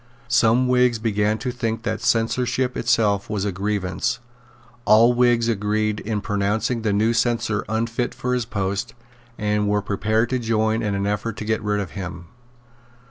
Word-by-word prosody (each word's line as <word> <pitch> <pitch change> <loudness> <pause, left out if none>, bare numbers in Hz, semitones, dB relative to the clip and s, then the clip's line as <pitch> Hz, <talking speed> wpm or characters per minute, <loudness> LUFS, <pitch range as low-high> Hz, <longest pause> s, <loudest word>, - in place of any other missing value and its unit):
Some 120 +1 +3
Whigs 125 -1 +3
began 105 -1 0
to 120 +3 -3
think 115 -2 -3
that 110 -2 -2
the 120 - -7
censorship 125 +2 +1
itself 110 -4 +1
was 105 -2 -2
a 100 - 0
grievance; 95 -1 -2 0.7
all 115 +2 +6
Whigs 120 -1 +3
agreed 105 -1 0
in 105 -1 -3
pronouncing 105 +3 -1
the 110 -2 0
new 110 +3 +2
censor 115 -2 0
unfit 115 +2 -1
for 125 0 -2
his 125 -2 0
post, 100 +2 -3 0.4
and 105 0 0
were 105 -1 +1
prepared 110 +3 0
to 130 - +1
join 110 -1 0
in 105 -3 -1
an 100 0 -1
effort 105 +2 -2
to 105 - -5
get 110 0 0
rid 105 -1 0
of 100 -4 -4
him. 90 -3 -7
110 Hz, 170 wpm, -22 LUFS, 105-115 Hz, 0.7 s, all